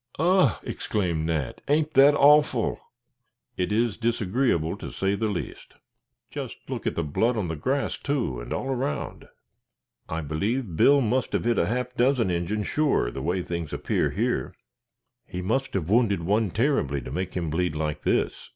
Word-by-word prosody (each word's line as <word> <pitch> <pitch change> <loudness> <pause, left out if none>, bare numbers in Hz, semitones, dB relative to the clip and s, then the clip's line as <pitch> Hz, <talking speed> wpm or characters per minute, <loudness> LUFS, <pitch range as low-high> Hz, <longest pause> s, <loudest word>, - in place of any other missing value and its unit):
"Ugh!" 175 - +3
exclaimed 85 -6 -2
Nat; 80 -5 -2
"ain't 150 +1 +1
that 140 +2 +7
awful?" 150 +1 +4 0.8
"It 90 +2 -1
is 115 0 +1
disagreeable, 115 - 0
to - - -7
say 95 +1 0
the 110 +2 -1
least." 95 -4 -6 0.6
"Just - - -6
look - - -4
at - - -1
the 85 - -1
blood 115 +11 0
on 95 -6 -2
the 80 - -2
grass, 135 - -1
too, 120 - -2
and - - -9
all - - -2
around. 135 +1 -3 0.8
I 80 +1 -2
believe 95 - -2
Bill 140 - +5
must 125 +1 0
have - - 0
hit 120 -3 +2
a - - +2
half 125 +2 -2
dozen 125 -5 +2
Injins 90 +5 -1
sure, 145 - +1
the 65 - -6
way 90 +5 -1
things 85 -3 -4
appear - - 0
here." - - -1 0.7
"He 90 0 -5
must 135 +7 -1
have 85 -5 -1
wounded 105 -4 +2
one 105 +4 +1
terribly 90 - 0
to 65 - -8
make 90 +5 -3
him 85 -4 -2
bleed 90 -1 0
like 75 -1 -2
this." - - -1
105 Hz, 170 wpm, -26 LUFS, 85-130 Hz, 0.8 s, that